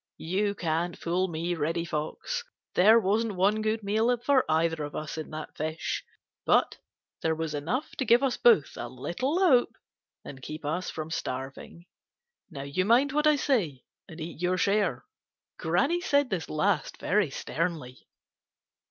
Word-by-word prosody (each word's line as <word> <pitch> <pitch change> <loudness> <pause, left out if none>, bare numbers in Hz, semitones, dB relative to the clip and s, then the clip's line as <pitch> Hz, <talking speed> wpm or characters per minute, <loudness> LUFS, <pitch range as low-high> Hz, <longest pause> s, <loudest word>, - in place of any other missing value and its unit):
You 200 +5 -1
can't 170 0 -1
fool 180 +2 0
me, 170 +1 -2
Reddy 165 +1 -1
Fox. 170 - -3 0.3
There 215 +5 +6
wasn't 215 +1 0
one 200 +4 +2
good 215 0 -1
meal 220 +5 +2
for 260 +2 +3
either 165 0 +1
of 145 - -6
us 155 -1 -4
in 155 -1 -6
that 155 0 -7
fish, 155 +1 -3 0.4
but - - +2 0.4
there 160 0 +1
was 160 -1 -3
enough 165 - -2
to 265 - -1
give 240 +3 +5
us 265 -2 +1
both 225 -12 +4
a 120 - -4
little 175 - -2
hope 315 -11 +4 0.5
and 135 -1 -9
keep 155 +3 -7
us 165 +5 -2
from 155 0 -6
starving. 135 +5 -5 0.6
Now 140 -6 -7
you 140 +6 -1
mind 245 +7 +4
what 300 +2 +2
I 305 - +6
say 200 - 0 0.3
and 160 -1 -10
eat 165 +1 -7
your 180 +1 +1
share." 200 0 +1 0.5
Granny 270 - +1
said 285 -7 +2
this 175 -5 -2
last 155 +1 0
very 200 -4 +1
sternly. 155 -3 -4
180 Hz, 160 wpm, -28 LUFS, 155-225 Hz, 0.6 s, There